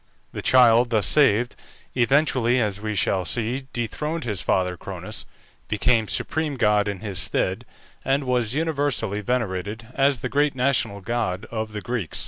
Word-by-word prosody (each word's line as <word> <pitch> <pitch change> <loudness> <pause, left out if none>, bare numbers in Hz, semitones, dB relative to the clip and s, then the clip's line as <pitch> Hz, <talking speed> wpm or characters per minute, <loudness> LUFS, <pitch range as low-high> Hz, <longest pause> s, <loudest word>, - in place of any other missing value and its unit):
The - - -5
child 120 -1 +5
thus 110 -3 +2
saved, 120 -5 +3 0.4
eventually, 130 -1 +2
as 105 -3 -1
we 110 -1 -3
shall 95 -1 +1
see, 120 +8 -2
dethroned 150 +8 -3
his 105 -6 -2
father 90 -1 +1
Cronus, 95 +4 -7 0.4
became 110 +1 +2
supreme 155 +4 -1
god 105 -4 +2
in 100 -2 -4
his 100 -4 -3
stead, - - -1 0.4
and 135 +2 +1
was 125 -2 0
universally 145 -10 -1
venerated 110 -2 -2
as 135 -3 +2
the - - -1
great 145 -1 +1
national 125 -6 0
god 110 -3 -2
of 110 -1 -3
the 105 - -4
Greeks. 115 -6 -3
115 Hz, 150 wpm, -24 LUFS, 105-130 Hz, 0.4 s, child